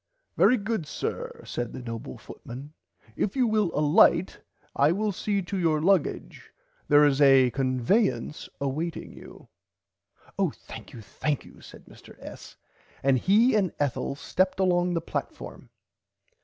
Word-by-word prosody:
Very 255 - +4
good 205 -6 -3
sir - - -5
said 120 -1 -4
the - - -6
noble 115 - -7
footman 135 +5 -10 0.4
if 205 - -2
you 260 -2 +3
will 215 -4 +1
alight 155 +5 +3 0.4
I 145 +3 +4
will 210 +4 0
see 200 +1 -2
to 190 +2 -4
your 160 -3 +2
luggage 180 0 0 0.4
there 145 0 +6
is 145 0 +2
a 135 -3 +6
convayance 130 - 0
awaiting 150 +5 -4
you. - - -14 0.9
Oh - - +2
thankyou 115 - -11
thankyou 145 +7 -4
said - - -14
Mr. - - -16
S. - - -11 0.5
and 135 -1 +3
he 220 - +4
and 195 -6 +1
Ethel 140 -1 -1
stepped 185 +6 -1
along 175 -1 +2
the 165 - 0
platform. - - -6
155 Hz, 135 wpm, -26 LUFS, 135-195 Hz, 0.9 s, there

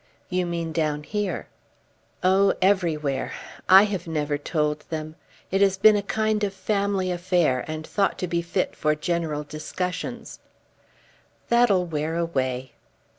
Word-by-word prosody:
"You 180 -1 0
mean 170 -1 -3
down 155 -2 -1
here." 210 +3 -3 0.8
"Oh; 190 +2 +4
everywhere. 160 -8 +1 0.4
I 190 +2 +9
have 195 -5 -3
never 150 -2 -1
told 150 0 -1
them. 155 -1 -4 0.4
It 195 +1 +1
has 195 -1 +4
been 215 +2 +7
a 205 - +1
kind 215 +1 0
of 200 -1 -1
family 200 -1 0
affair 175 -7 +1
and 155 0 -5
thought 200 +2 0
to 180 - -2
be 170 0 0
fit 170 +2 -2
for 150 -1 +1
general 155 -2 -2
discussions." 155 +5 -5 1.1
"That'll 235 -7 +4
wear 160 -1 -2
away." 130 -7 -1
170 Hz, 135 wpm, -25 LUFS, 155-195 Hz, 1.1 s, I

